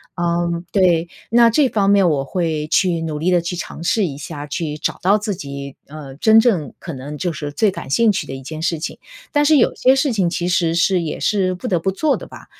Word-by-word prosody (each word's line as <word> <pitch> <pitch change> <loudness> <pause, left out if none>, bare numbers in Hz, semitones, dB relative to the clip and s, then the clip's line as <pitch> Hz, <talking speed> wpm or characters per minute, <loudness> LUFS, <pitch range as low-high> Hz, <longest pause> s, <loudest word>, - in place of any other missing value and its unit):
嗯， 170 -1 -1
对， 175 -4 +3 0.2
那 235 0 +6
这 270 +4 +3
方 200 -4 +1
面 200 -2 +4
我 145 -4 +1
会 155 -1 -2
去 170 0 +1
努 155 -2 -3
力 175 +4 0
地 175 -1 +3
去 180 +1 -4
尝 170 - -7
试 200 +4 +1
一 145 - -4
下， 145 +1 -7
去 150 0 -4
找 - - -3
到 200 +4 +4
自 210 0 -3
己， 140 -4 -7
呃， 145 -2 -9
真 220 +5 +5
正 190 - +1
可 170 - -8
能 140 +3 -7
就 175 0 -2
是 145 -1 -5
最 210 +7 +1
感 160 - -8
兴 225 +9 +3
趣 - - -3
的 - - -6
一 135 - -9
件 155 +3 -7
事 165 0 0
情， 155 - -6 0.3
但 290 0 +2
是 305 +1 +5
有 245 - +3
些 260 +1 +3
事 270 -1 +1
情 190 -5 +1
其 175 0 -2
实 170 -2 +1
是 180 +1 +2
也 160 - -4
是 185 -3 +1
不 245 - -6
得 180 -6 +1
不 190 - -1
做 290 +8 +1
的 - - -9
吧， - - -13
175 Hz, 260 characters per minute, -19 LUFS, 155-200 Hz, 0.3 s, 那